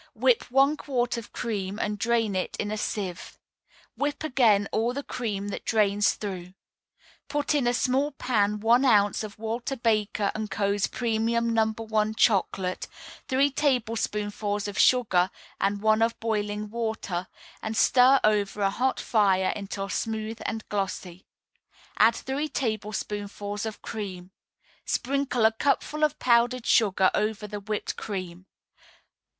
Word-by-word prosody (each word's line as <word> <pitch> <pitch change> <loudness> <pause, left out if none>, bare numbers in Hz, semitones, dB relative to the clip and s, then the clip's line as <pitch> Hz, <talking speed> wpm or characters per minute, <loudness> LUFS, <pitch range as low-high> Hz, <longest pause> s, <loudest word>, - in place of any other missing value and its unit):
Whip - - +2
one 275 +4 +4
quart 245 -5 -1
of 235 -2 -7
cream, 205 -4 -3
and 210 -1 -2
drain 225 -2 +1
it 185 - -2
in 205 - -2
a - - -1
sieve. 185 -5 -4 0.6
Whip 290 +1 -2
again 230 -9 +3
all 235 +3 0
the 280 - -3
cream 205 -7 -3
that - - -5
drains 205 -1 +2
through. 185 -3 -6 0.7
Put 290 0 0
in 280 -5 +1
a 240 - +3
small 265 +4 +1
pan 210 -6 0
one 235 +4 +4
ounce 205 -5 +3
of 210 -2 -8
Walter 230 +5 -3
Baker 215 -3 0
& 215 - -4
Co.'s 200 0 0
Premium 230 0 0
No. 225 -1 +4
1 220 -1 -1
Chocolate, 190 -4 +1 0.4
three 275 +2 +2
tablespoonfuls 215 -6 -1
of 205 - -5
sugar 190 -8 +4 0.3
and 200 +1 0
one 215 0 +4
of 230 +1 +1
boiling 210 -1 -2
water, 220 -6 -3 0.3
and 220 0 -4
stir 260 +3 +6
over 210 -1 +1
a 195 -1 +2
hot 255 +5 0
fire 195 -4 +2
until 200 -1 -5
smooth 220 +1 -3
and 220 0 -4
glossy. 190 -2 -4 0.7
Add 225 +2 +6
three 280 +5 -3
tablespoonfuls 210 -3 -3
of 220 - -8
cream. 190 -4 -6 0.5
Sprinkle 270 -3 0
a 220 - +6
cupful 285 +5 0
of 300 0 +2
powdered 240 0 +2
sugar 190 -4 +4
over 215 0 -1
the 210 0 -6
whipped 210 +1 -4
cream. 185 -2 -6
220 Hz, 140 wpm, -26 LUFS, 205-240 Hz, 0.7 s, stir